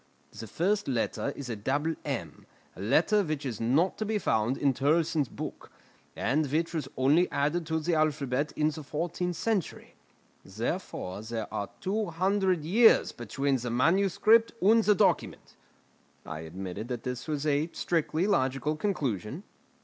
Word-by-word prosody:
The 115 - -9
first 200 - 0
letter 130 +2 -1
is 140 - -7
a 120 - -3
double 145 +9 -1
m, - - -5 0.3
a - - -9
letter 160 - +3
which 155 -6 -3
is 115 -5 -4
not 140 +11 +2
to - - 0
be 215 0 0
found 120 - 0
in 140 -2 +2
Turlleson's 155 0 +1
book, - - -7 0.4
and 145 -1 0
which 165 +3 0
was 155 -5 -2
only 145 +7 +4
added 150 +4 0
to 160 0 0
the 170 +2 -1
alphabet 150 -3 0
in 155 0 +2
the 155 - -7
fourteenth 170 +4 -3
century. 210 -1 -2 0.5
Therefore 95 +3 -4
there 110 0 -5
are 100 - -3
two 210 +2 -1
hundred 185 0 +1
years 225 +7 +5
between 135 +4 -1
the 125 0 -4
manuscript 195 - +3
and 220 +4 +5
the 210 -1 +4
document." - - 0 0.7
I 80 -1 -6
admitted 90 +6 -6
that 120 -2 -4
this 125 +2 -5
was 150 -1 -2
a 150 +2 +1
strictly 165 0 0
logical 150 -6 +1
conclusion. 150 - -2
150 Hz, 155 wpm, -29 LUFS, 130-175 Hz, 0.7 s, years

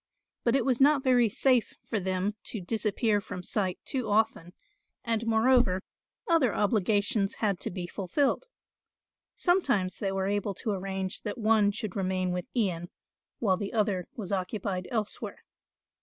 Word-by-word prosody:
But 235 +1 +3
it 270 - +2
was 260 -1 +1
not 285 0 +5
very 245 -3 +4
safe 250 +2 +2
for 220 - -1
them 190 +2 -1
to 220 - -4
disappear 210 +2 0
from 180 -2 -7
sight 185 -1 -1
too 255 -6 -2
often 205 -5 +1 0.5
and 230 0 -1
moreover, 225 -4 +3 0.4
other 320 - +3
obligations 205 0 +2
had 200 -5 0
to - - -3
be 180 -1 -5
fulfilled. 215 - -1 0.9
Sometimes 270 - +1
they 195 -2 -1
were 195 0 -1
able 200 0 -1
to 215 - -2
arrange 190 -1 -3
that 210 0 -4
one 215 -2 +4
should 205 -1 -4
remain 185 -2 0
with 180 -1 -3
Ian 175 -7 0 0.5
while 190 -5 +2
the 200 +3 -4
other 205 -5 0
was 205 -5 -5
occupied 190 -1 -2
elsewhere. 220 -3 -3
205 Hz, 150 wpm, -29 LUFS, 190-230 Hz, 0.9 s, not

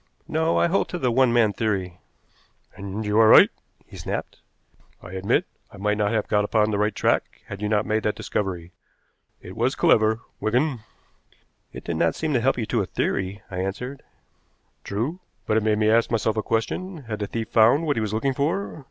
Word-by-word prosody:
"No, 160 +1 +1
I - - +4
hold 180 +3 +1
to 180 - -3
the 130 -7 0
one 130 0 +3
man 115 -3 +3
theory." 95 -4 -2 0.8
"And 100 +2 -5
you 105 +1 +2
are 110 - +7
right," - - +8 0.3
he - - -13
snapped. - - -5 0.6
"I 90 - -11
admit 95 +1 0 0.3
I - - -13
might 105 +2 -1
not 105 -1 +1
have 110 -2 0
got 105 0 +2
upon 105 +1 +1
the 100 - -1
right 105 0 0
track - - 0
had 100 0 -8
you 105 - -1
not 105 -1 +1
made 110 0 0
that 105 - -1
discovery. 95 -5 -3 0.7
It 90 - -10
was 120 +5 0
clever, 110 0 +3 0.2
Wigan." 125 +4 0 0.9
"It - - -9
did 85 - -3
not 80 0 +1
seem 160 -2 -2
to 125 - +2
help 135 +2 +2
you 115 - -1
to 115 0 0
a 95 - -3
theory," 95 +1 -2
I 90 - -5
answered. 125 +9 -4 0.8
"True. 120 - -3 0.3
But 110 - +1
it - - +2
made 105 0 +1
me 110 0 +3
ask 115 +1 +3
myself 110 -1 0
a 110 - 0
question. 150 - -3
Had 110 -3 -5
the 105 - -3
thief 110 +1 -4
found 120 +8 +4
what 145 -2 +1
he 115 - -1
was 110 -2 -2
looking 125 +5 0
for? 160 +7 -2
110 Hz, 205 wpm, -24 LUFS, 105-125 Hz, 0.9 s, right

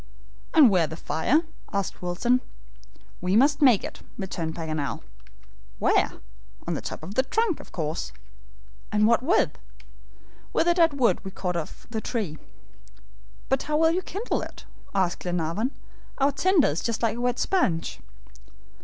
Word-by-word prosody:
"And 290 -8 +8
where's 170 -5 +3
the 160 - -6
fire?" 255 - +1 0.3
asked 200 -3 -2
Wilson. 215 +8 +1 0.8
"We 180 +2 +1
must 285 +6 +4
make 250 -8 +6
it," - - -7 0.2
returned 170 -5 -4
Paganel. 155 -4 -3 0.7
"Where?" - - +2 0.5
"On - - -1
the - - -3
top - - -6
of 185 +5 -6
the 260 - +4
trunk, 420 - 0
of - - -13
course." 155 - -3 0.8
"And 210 0 +3
what 230 +1 +4
with?" 255 - +2 0.9
"With - - +2
the 345 - +5
dead 335 -3 +4
wood 240 - +3
we 190 - -5
cut 180 -2 -3
off 165 -3 -5
the 220 -2 -2
tree." 200 -10 -3 1.1
"But 265 0 +1
how 300 0 0
will 320 +1 +4
you 360 +3 0
kindle 400 +6 -2
it?" - - -9 0.3
asked 185 -3 +1
Glenarvan. 175 +6 -1 0.5
"Our 280 +1 +3
tinder 350 +2 +3
is 150 +3 -2
just 230 0 -2
like 230 +1 +1
wet 245 0 0
sponge." 185 - 0
220 Hz, 155 wpm, -26 LUFS, 175-285 Hz, 1.1 s, And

